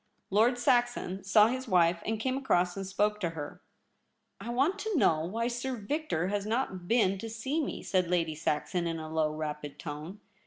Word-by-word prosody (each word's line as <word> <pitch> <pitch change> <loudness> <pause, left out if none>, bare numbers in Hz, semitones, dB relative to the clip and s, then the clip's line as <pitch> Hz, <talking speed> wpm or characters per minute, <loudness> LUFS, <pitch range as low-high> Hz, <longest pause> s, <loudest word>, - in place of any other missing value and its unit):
Lord 225 +5 +4
Saxon 240 -6 +1
saw 205 +2 +6
his 260 +1 -3
wife, 170 -3 +3
and 220 0 -1
came 255 +3 0
across 180 -10 +1
and 195 -1 -4
spoke 210 +2 +1
to 175 -5 0
her. 145 -1 -6 0.4
* - - -27
I 235 - -6
want 280 +11 +1
to 430 -3 -1
know 160 - +4
why 225 +6 -1
Sir 245 +2 -2
Victor 215 - -2
has 205 0 -1
not 215 -6 -2
been 195 -4 +3
to 225 - -5
see 265 +8 -2
me,' - - -5
said 185 -2 +1
Lady 170 -2 +1
Saxon, 160 +3 -1
in 165 -1 -2
a 155 -1 -6
low, 155 -1 +2
rapid 150 -2 -5
tone. 155 +5 -7
200 Hz, 195 wpm, -30 LUFS, 170-240 Hz, 0.4 s, saw